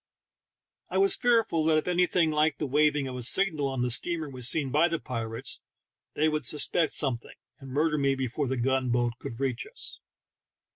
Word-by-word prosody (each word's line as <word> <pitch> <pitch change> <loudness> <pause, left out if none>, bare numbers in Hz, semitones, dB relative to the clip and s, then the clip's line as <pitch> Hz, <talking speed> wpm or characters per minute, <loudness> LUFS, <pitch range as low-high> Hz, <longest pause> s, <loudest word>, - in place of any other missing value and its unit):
I - - -2
was 395 0 +4
fearful 230 -9 +1
that 160 -1 +3
if 155 - -2
anything 180 -2 +2
like 155 0 +1
the - - -3
waving 145 0 +1
of 130 - -6
a 125 - -5
signal 155 +2 +3
on 135 -2 -2
the 125 - 0
steamer 160 +5 0
was 130 -3 -1
seen 140 -5 0
by 155 +5 +3
the 165 -1 -2
pirates 115 -6 -2 0.5
they 155 - +2
would 155 -1 -1
suspect 155 +2 +2
something, 130 -6 -2 0.2
and 135 -2 -11
murder 150 +3 0
me 140 -1 +1
before 130 +2 -3
the 130 +1 -2
gun 130 +1 0
boat 120 0 0
could 125 -5 -8
reach 130 -3 -2
us. - - -5
145 Hz, 190 wpm, -27 LUFS, 130-160 Hz, 0.5 s, was